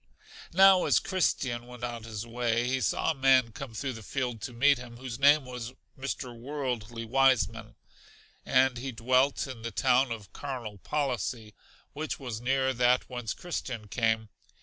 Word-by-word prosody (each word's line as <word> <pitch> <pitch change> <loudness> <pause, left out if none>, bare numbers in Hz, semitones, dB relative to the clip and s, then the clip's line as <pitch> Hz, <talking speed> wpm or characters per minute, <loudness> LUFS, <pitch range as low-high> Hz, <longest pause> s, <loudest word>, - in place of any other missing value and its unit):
Now 190 +1 +6
as - - +4
Christian 130 -10 0
went 125 -1 -11
on 120 -2 -4
his 110 -1 -5
way 120 0 0
he 130 +1 0
saw - - +1
a - - -1
man 130 -4 +4
come 120 0 -8
through 130 +3 -3
the 115 - -9
field 125 -1 -3
to 125 - -5
meet 135 +3 +4
him, 120 -1 -10
whose 125 -1 -6
name 145 0 +5
was 125 -1 -6 0.2
Mr. 130 -2 -5
Worldly 120 -3 -4
Wiseman, 130 0 +2 0.7
and 130 -1 +3
he 135 +2 -4
dwelt 130 +4 +2
in 130 -4 -8
the 115 - -4
town 125 +6 +2
of 105 -4 -7
Carnal 120 -8 -6
Policy, 120 -5 -2 0.4
which 155 +2 -4
was 120 -5 -5
near 130 +1 +1
that 125 +1 +2
whence 120 -3 -4
Christian 125 -10 -5
came. 110 -1 0
125 Hz, 165 wpm, -29 LUFS, 115-135 Hz, 0.7 s, Now